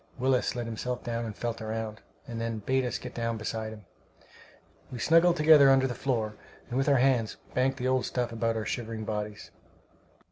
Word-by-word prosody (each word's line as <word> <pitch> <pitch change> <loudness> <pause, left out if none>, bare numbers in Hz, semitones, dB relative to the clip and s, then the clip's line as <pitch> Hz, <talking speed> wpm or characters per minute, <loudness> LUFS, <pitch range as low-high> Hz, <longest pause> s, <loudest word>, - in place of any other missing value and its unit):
Willis 130 -1 +1
let 120 -1 -3
himself 120 +2 -4
down 115 -1 -2
and 110 -2 -6
felt 115 -1 -4
around, 110 0 -4 0.3
and 115 -2 -5
then 115 -1 -2
bade 130 +5 0
us 125 - -2
get - - -8
down 115 -1 -2
beside 110 0 -4
him. 105 -2 -11 1.1
We 125 - -5
snuggled 165 +7 +4
together 150 -2 +7
under 135 0 +5
the 130 - -1
floor, 115 -4 -1 0.4
and 125 - -2
with 135 - +2
our 140 - +5
hands 125 -4 +2 0.2
banked 130 +1 +1
the 125 - -2
old 130 -1 +1
stuff 125 -2 -2
about 115 0 0
our 110 - -3
shivering 115 -2 -4
bodies. 105 -1 -5
120 Hz, 190 wpm, -29 LUFS, 110-130 Hz, 1.1 s, together